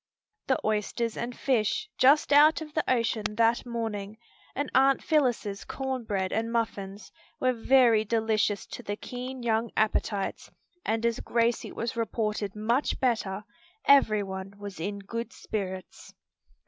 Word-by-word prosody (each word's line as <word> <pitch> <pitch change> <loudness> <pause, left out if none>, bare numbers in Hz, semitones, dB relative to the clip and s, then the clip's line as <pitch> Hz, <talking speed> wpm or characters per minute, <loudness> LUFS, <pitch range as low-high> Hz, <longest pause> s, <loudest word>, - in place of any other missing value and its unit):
The 265 - +2
oysters 215 +2 -1
and 240 +1 -5
fish, 260 - +1
just 290 +3 +5
out 300 +3 +7
of 305 -2 -8
the 310 - +1
ocean 225 -3 0
that 230 +2 +2
morning, 220 -3 -4 0.4
and 285 +2 -2
Aunt 270 +1 +4
Phillis's 245 -10 +1
corn 265 -3 -4
bread 190 -3 -1
and 225 +1 -1
muffins 205 -4 -3 0.3
were 255 0 +2
very 235 -2 +4
delicious 220 -2 0
to - - -8
the 205 - -4
keen 250 +3 -7
young 225 0 +1
appetites, 210 -2 0 0.3
and 225 +1 -1
as 235 -1 +1
Gracie 235 0 0
was 235 +2 -4
reported 215 -3 -2
much 235 +6 0
better, 210 -6 0 0.4
every 220 -7 +5
one 190 0 -6
was 200 -4 -8
in 200 +5 -3
good 230 +3 -5
spirits. 190 -3 -6
225 Hz, 140 wpm, -28 LUFS, 210-250 Hz, 0.4 s, out